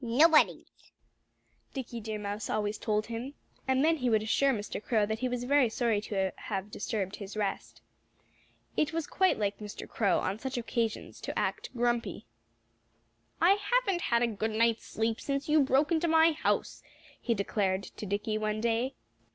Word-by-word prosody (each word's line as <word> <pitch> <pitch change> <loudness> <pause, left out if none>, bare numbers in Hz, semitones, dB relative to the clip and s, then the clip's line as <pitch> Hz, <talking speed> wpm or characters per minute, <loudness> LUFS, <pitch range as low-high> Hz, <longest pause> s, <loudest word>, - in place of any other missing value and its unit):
"Nobody's!" 305 +7 +3 0.8
Dickie 245 -3 -5
Deer 220 -1 -4
Mouse 205 0 -4
always 210 0 -1
told 215 -1 0
him. 235 +5 -6 0.3
And 265 +2 +3
then 325 0 +3
he 250 -4 0
would 220 -2 +3
assure 275 +5 +3
Mr. 210 -2 -4
Crow 215 -2 +2
that 220 +1 -3
he 255 +1 -1
was 245 0 -2
very 270 -1 +4
sorry 225 -3 +1
to 195 -3 -1
have 200 0 -4
disturbed 200 -2 -3
his 200 +1 -8
rest. 205 -2 -3 0.9
It 310 +1 +1
was 330 -2 -1
quite 375 0 +2
like 205 -1 -1
Mr. 210 -1 -7
Crow, 200 -5 +1
on 195 +3 -2
such 265 +2 -4
occasions, 230 -1 -2
to - - -5
act - - -1
grumpy. 235 - 0 1.1
"I 345 +3 +6
haven't 405 -2 +1
had 235 0 +2
a - - +3
good 220 0 -2
night's 225 +1 +1
sleep 225 0 -1
since 275 0 -2
you 305 0 +5
broke 275 +4 +2
into 335 +1 +2
my 325 0 +5
house," 305 - -1 0.4
he 235 - +1
declared 195 -1 0
to 210 - -8
Dickie 210 +2 -1
one 215 0 -1
day. 235 +4 0
230 Hz, 170 wpm, -30 LUFS, 210-275 Hz, 1.1 s, I